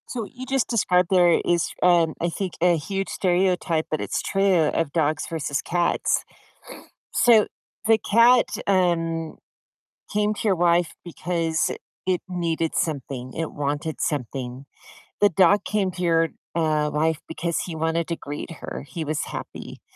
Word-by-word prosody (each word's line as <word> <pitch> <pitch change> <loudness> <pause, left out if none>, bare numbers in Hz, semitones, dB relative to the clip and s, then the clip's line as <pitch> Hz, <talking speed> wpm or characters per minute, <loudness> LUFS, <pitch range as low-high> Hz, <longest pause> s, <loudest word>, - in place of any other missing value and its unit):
So, 235 -4 -3
you 250 +5 -9
just 265 -1 0
described 180 -6 +2
there 175 -3 +5
is, 170 -2 +1
um, 170 -3 +4
I 170 - +1
think 185 +1 -4
a 175 0 +5
huge 195 +5 -3
stereotype- 180 -3 +1
but 155 - -1
it's - - -2
true- 195 -5 +2
of 165 -4 0
dogs 155 -1 0
versus 145 -4 -2
cats. 175 0 0 0.9
So, 225 -3 +5 0.4
the 225 0 +5
cat, 235 +3 +5 0.2
um, 165 -4 +1 0.8
came 210 0 +1
to - - -7
your 195 - +3
wife 175 -1 +2
because 165 -2 -1 0.3
it 185 -1 +1
needed 165 -3 -2
something, 135 -4 -3
it 165 -1 -3
wanted 145 +2 -3
something. 130 -2 -3 0.6
The 205 - +6
dog 190 +3 +4
came 205 -3 0
to 180 - -6
your, 165 -1 +3 0.3
uh, 155 -2 +1
wife 155 +1 +1
because 170 +1 -2
he 170 - -5
wanted 160 +1 -1
to 170 - -2
greet 145 +2 -7
her, - - -6
he 165 -3 -5
was 155 0 -2
happy, - - -8
170 Hz, 150 wpm, -24 LUFS, 155-185 Hz, 0.9 s, The